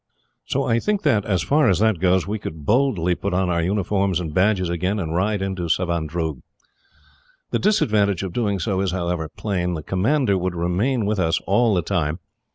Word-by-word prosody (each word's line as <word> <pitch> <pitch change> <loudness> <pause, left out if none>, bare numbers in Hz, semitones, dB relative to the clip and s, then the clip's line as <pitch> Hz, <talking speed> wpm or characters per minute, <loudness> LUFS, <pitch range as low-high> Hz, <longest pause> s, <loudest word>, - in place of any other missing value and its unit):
"So - - 0
I 115 - +1
think 210 - -1
that, 120 -9 +2
as 95 -6 0
far 145 - +3
as 95 - +3
that 110 -4 +2
goes, 90 -1 +2
we 105 +3 -3
could 80 -5 -7
boldly 110 - +2
put 95 +1 -3
on 90 -1 +1
our 85 -1 +1
uniforms 95 0 0
and 80 -4 -5
badges 95 +1 +2
again, 90 +4 -1
and 80 -4 -3
ride 100 +2 0
into 95 -3 -3
Savandroog. 85 -2 -1 1.1
The - - +1
disadvantage 105 - +2
of 95 -3 -5
doing 105 -5 0
so 95 +2 -1
is, 95 - 0
however, 85 -3 -2
plain. 90 -1 -2
The 75 - -6
commander 100 - +1
would 90 0 -2
remain 100 +8 0
with 105 0 0
us 80 -2 +1
all 110 +2 +2
the 90 - 0
time. 80 -4 -1
95 Hz, 190 wpm, -22 LUFS, 85-105 Hz, 1.1 s, far